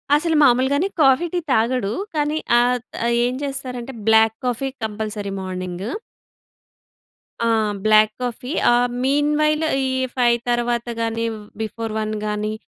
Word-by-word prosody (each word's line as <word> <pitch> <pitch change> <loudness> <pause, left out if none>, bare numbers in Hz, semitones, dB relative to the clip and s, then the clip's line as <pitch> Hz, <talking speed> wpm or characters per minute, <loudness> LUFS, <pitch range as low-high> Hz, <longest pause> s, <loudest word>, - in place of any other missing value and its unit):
అసలు 320 +1 +1
మామూలుగానే 275 +6 +3
coffee, 270 +3 +5
tea 355 - +1
తాగడు. 230 -2 +1 0.2
కానీ 300 +1 0 0.2
ఆత్ 245 0 0 0.2
ఆహ్, 235 - +2
ఏం 245 - -1
చేస్తారంటే, 260 -2 -5
బ్లాక్ 220 0 +5
కాఫీ 250 +2 -1
కంపల్సరీ 210 -1 -4
మార్నింగు. 185 +2 -5 1.6
ఆ! - - +2 0.4
బ్లాక్ 215 0 +5
కాఫీ 250 +3 -4 0.2
ఆహ్, 245 +1 +3 0.2
మీన్ 290 +2 +2
వైల్ 305 +1 +2 0.2
ఈ - - 0 0.3
5 240 -2 +3
తర్వాత 240 0 0
గాని 230 0 -1 0.4
బిఫోర్ 225 +1 -4
1 215 0 -2
గాని, 210 0 -2
240 Hz, 130 wpm, -21 LUFS, 220-270 Hz, 1.6 s, కాఫీ